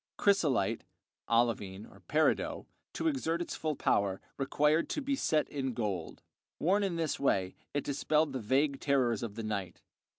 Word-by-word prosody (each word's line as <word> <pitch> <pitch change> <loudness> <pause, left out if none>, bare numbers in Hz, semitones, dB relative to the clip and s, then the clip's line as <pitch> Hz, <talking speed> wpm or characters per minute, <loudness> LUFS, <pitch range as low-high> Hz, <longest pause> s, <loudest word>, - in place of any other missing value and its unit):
Chrysolite 155 - +2 0.5
(olivine, 115 -4 +1 0.2
peridot), 155 +1 +1 0.3
to - - -1
exert 210 - 0
its 175 - -4
full 155 -2 -2
power, 100 -6 +1 0.2
required 150 +3 +2
to - - -1
be 280 -1 0
set 155 - +1
in 135 -4 -3
gold; 100 -8 -3 0.3
worn 195 +6 +2
in 195 -4 0
this 165 -3 -1
way 95 -9 +1 0.2
it 145 - -1
dispelled 150 +1 +1
the 130 - -2
vague 135 +5 +1
terrors 130 -6 +2
of 115 -4 -5
the 115 - -4
night. 100 -4 -4
140 Hz, 155 wpm, -32 LUFS, 110-160 Hz, 0.5 s, Chrysolite